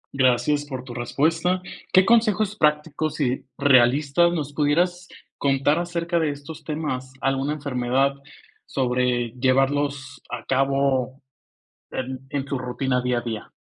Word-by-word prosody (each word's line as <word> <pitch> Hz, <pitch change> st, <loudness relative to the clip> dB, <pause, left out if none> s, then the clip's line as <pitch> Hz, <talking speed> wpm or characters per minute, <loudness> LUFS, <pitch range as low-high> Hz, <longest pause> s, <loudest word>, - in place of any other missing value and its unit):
Gracias 135 Hz, +3 st, +2 dB
por 130 Hz, -3 st, -6 dB
tu 125 Hz, -2 st, -9 dB
respuesta. 160 Hz, +9 st, 0 dB, 0.3 s
¿Qué 185 Hz, 0 st, +6 dB
consejos 215 Hz, -3 st, +3 dB
prácticos 150 Hz, -1 st, 0 dB
y 130 Hz, -4 st, -1 dB
realistas 140 Hz, +5 st, +4 dB
nos 150 Hz, -4 st, -3 dB
pudieras 175 Hz, +5 st, +1 dB, 0.3 s
contar 140 Hz, +3 st, +2 dB
acerca 170 Hz, 0 st, -1 dB
de 160 Hz, -2 st, +1 dB
estos 145 Hz, +2 st, -8 dB
temas? 140 Hz, -5 st, -4 dB
¿Alguna 135 Hz, +2 st, 0 dB
enfermedad 135 Hz, -1 st, 0 dB, 0.5 s
sobre 125 Hz, -2 st, 0 dB
llevarlos 135 Hz, +1 st, 0 dB
a 120 Hz, -2 st, -6 dB
cabo 135 Hz, -1 st, +1 dB, 0.7 s
en 130 Hz, 0 st, -4 dB
en 140 Hz, 0 st, -2 dB
su 140 Hz, -2 st, -2 dB
rutina 125 Hz, +1 st, -1 dB
día 125 Hz, -1 st, 0 dB
a -, -, -1 dB
día? 110 Hz, -3 st, -5 dB
140 Hz, 130 wpm, -23 LUFS, 130-155 Hz, 0.7 s, Qué